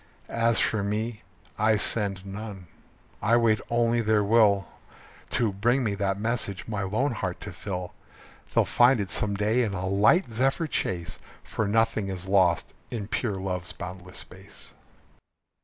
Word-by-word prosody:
As 115 0 +2
for 110 - +2
me, 110 +2 -2 0.4
I 110 0 +4
send 100 -3 +1
none. 100 -1 -7 0.6
I 115 +2 +4
wait 110 -2 +3
only 120 0 +2
their 110 -1 +2
will 100 -3 +4 0.6
To 115 -4 +1
bring 120 +7 +2
me 105 -3 0
that 100 -1 -1
message 110 -4 -2
my 105 -3 -2
lone 110 +9 0
heart 115 - -3
to - - -6
fill. 90 -3 -5 0.6
They'll - - +3
find 120 0 +4
it 100 -2 -3
some 100 -1 +1
day 105 +5 +2
in 105 -5 -1
a 90 0 -3
light 105 - +3
zephyr 135 +8 +1
chase, 90 - -2 0.2
For 110 - -2
nothing 110 -1 +1
is 95 -1 -4
lost 95 -3 +2 0.2
in 110 -3 -5
pure 105 -6 -1
love's 90 -2 -3
boundless 90 -1 -8
space. - - -8
105 Hz, 155 wpm, -27 LUFS, 95-115 Hz, 0.6 s, I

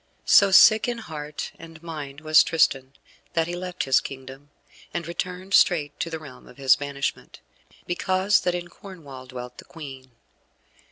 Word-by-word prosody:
So 200 - +6
sick 215 +4 +7
in 240 -1 -2
heart 150 -8 -7
and 165 -1 -13
mind 150 -4 -7
was 155 0 +6
Tristan 135 -5 +1 0.4
that 165 -1 +1
he 175 +1 -5
left 180 0 -4
his 135 -1 +3
kingdom, 135 +1 -10 0.5
and 170 - -2
returned 180 +2 -5
straight 150 -7 +3
to 170 - -2
the 165 - -4
realm 140 -5 -13
of - - -16
his 135 -2 +5
banishment, 140 -1 -5 0.5
because 185 +2 +1
that 180 -1 0
in 175 0 -5
Cornwall 145 -11 -12
dwelt 125 -1 -9
the - - -11
Queen. 135 -5 -10
160 Hz, 160 wpm, -24 LUFS, 140-180 Hz, 0.5 s, sick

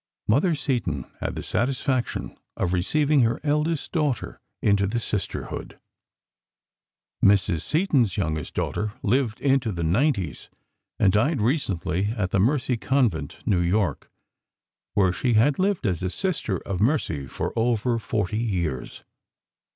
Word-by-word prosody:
Mother 155 - +3
Seton 120 - -2
had - - -3
the - - -5
satisfaction 130 +2 -1 0.2
of 90 - 0
receiving 145 +11 +2
her 115 -1 +2
eldest 150 +1 0
daughter 150 -7 -1 0.2
into 100 -1 +2
the 105 - -1
Sisterhood. 105 -3 -4 1.4
Mrs. 100 -5 +4
Seton's 145 - +1
youngest 80 -5 -2
daughter 105 0 -2
lived 120 0 +1
into 135 -5 +2
the 85 -3 -3
nineties 95 - 0 0.5
and 95 -3 +3
died 130 +8 +2
recently 100 - 0
in 100 -3 +1
the 100 - +2
Mercy 125 +3 +2
Convent, 110 - 0
New 90 -3 +2
York, 90 -3 0 0.9
where 95 -3 +3
she 120 +5 0
had 135 +9 +3
lived 190 -6 +1
as 90 -4 0
a 95 - -1
Sister 155 - -1
of 95 -1 -4
Mercy 105 - +1
for - - -4
over 115 0 +1
forty 105 -2 -1
years. 85 - -2
110 Hz, 130 wpm, -25 LUFS, 95-135 Hz, 1.4 s, Mrs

